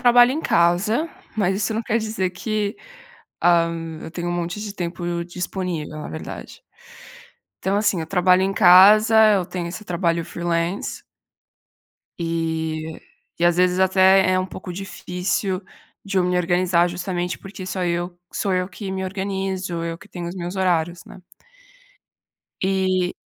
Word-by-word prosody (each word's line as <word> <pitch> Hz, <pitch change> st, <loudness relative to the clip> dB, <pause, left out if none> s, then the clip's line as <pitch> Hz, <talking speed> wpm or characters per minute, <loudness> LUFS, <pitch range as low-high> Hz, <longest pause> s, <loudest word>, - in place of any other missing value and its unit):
trabalho 245 Hz, 0 st, +6 dB
em 300 Hz, +4 st, -1 dB
casa, 190 Hz, -, +2 dB, 0.3 s
mas 195 Hz, -2 st, +1 dB
isso 210 Hz, +2 st, -1 dB
não 225 Hz, -, -1 dB
quer 225 Hz, +1 st, 0 dB
dizer 215 Hz, -4 st, -2 dB
que 210 Hz, +2 st, -2 dB, 0.6 s
ah, 170 Hz, -1 st, +4 dB, 0.3 s
eu -, -, -7 dB
tenho 175 Hz, +1 st, -4 dB
um -, -, -1 dB
monte 175 Hz, +3 st, -3 dB
de 210 Hz, -1 st, -6 dB
tempo 175 Hz, -1 st, -3 dB
disponível 175 Hz, -3 st, -4 dB
na 150 Hz, -, -6 dB
verdade. 160 Hz, -, -8 dB, 1.0 s
Então, 195 Hz, +1 st, 0 dB
assim 205 Hz, -4 st, +2 dB
eu 160 Hz, -, -3 dB
trabalho 185 Hz, 0 st, +4 dB
em 195 Hz, +1 st, 0 dB
casa, 210 Hz, +4 st, +7 dB, 0.2 s
eu 190 Hz, -3 st, +1 dB
tenho 175 Hz, -1 st, -4 dB
esse 185 Hz, +4 st, -7 dB
trabalho 170 Hz, -3 st, 0 dB
freelance 170 Hz, +3 st, -2 dB, 1.2 s
eh, 160 Hz, -1 st, -2 dB, 0.4 s
e 175 Hz, -, +3 dB
às 175 Hz, 0 st, +3 dB
vezes 180 Hz, 0 st, +3 dB
até 190 Hz, 0 st, +5 dB
é 185 Hz, -, +3 dB
um 185 Hz, -, -1 dB
pouco 185 Hz, -1 st, -8 dB
difícil 185 Hz, 0 st, -3 dB, 0.4 s
de 195 Hz, -1 st, -2 dB
eu 185 Hz, -, +4 dB
me 180 Hz, 0 st, 0 dB
organizar, 175 Hz, 0 st, +2 dB
justamente 175 Hz, 0 st, -3 dB
porque 195 Hz, -1 st, -9 dB
só 185 Hz, 0 st, -3 dB
eu 175 Hz, 0 st, -2 dB, 0.2 s
sou 195 Hz, -, -1 dB
eu 180 Hz, 0 st, 0 dB
que 195 Hz, +1 st, -7 dB
me 190 Hz, 0 st, -3 dB
organizo, 190 Hz, -2 st, -3 dB
eu 165 Hz, 0 st, -4 dB
que 210 Hz, -, -15 dB
tenho 175 Hz, -4 st, -6 dB
os 175 Hz, -, -6 dB
meus 175 Hz, +1 st, -5 dB
horários, 175 Hz, -2 st, 0 dB
né. 185 Hz, -, -13 dB, 1.4 s
E 185 Hz, -1 st, +1 dB
180 Hz, 155 wpm, -22 LUFS, 175-195 Hz, 1.4 s, casa